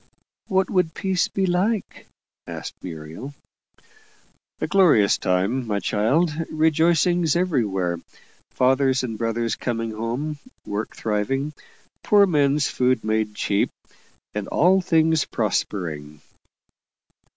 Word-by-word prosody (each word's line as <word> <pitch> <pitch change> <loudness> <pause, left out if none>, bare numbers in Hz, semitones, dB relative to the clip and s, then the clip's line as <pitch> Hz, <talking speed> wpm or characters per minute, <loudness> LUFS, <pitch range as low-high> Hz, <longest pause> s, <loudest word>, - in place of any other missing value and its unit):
"What 190 0 +2
would 180 -5 +1
peace 190 -2 0
be 195 - -1
like?" 190 +4 -1 0.4
asked - - -6
Muriel. 85 - -8 1.2
"A - - -1
glorious 170 - +4
time, 100 +8 0
my 105 -2 0
child 135 - +1 0.2
rejoicings 160 +1 +2
everywhere, 105 - 0 0.5
fathers 130 +1 +2
and 115 -3 -3
brothers 115 +1 -1
coming 115 -2 -3
home, 120 +8 -3 0.3
work 105 +2 -4
thriving, 135 +8 -1 0.5
poor 205 -1 +5
men's 145 -4 +2
food 125 -2 +1
made 110 -1 -1
cheap, 100 -1 0 0.6
and 105 -1 -4
all 185 +3 +3
things 160 -3 +3
prospering." 80 -9 -3
130 Hz, 105 wpm, -23 LUFS, 105-165 Hz, 1.2 s, poor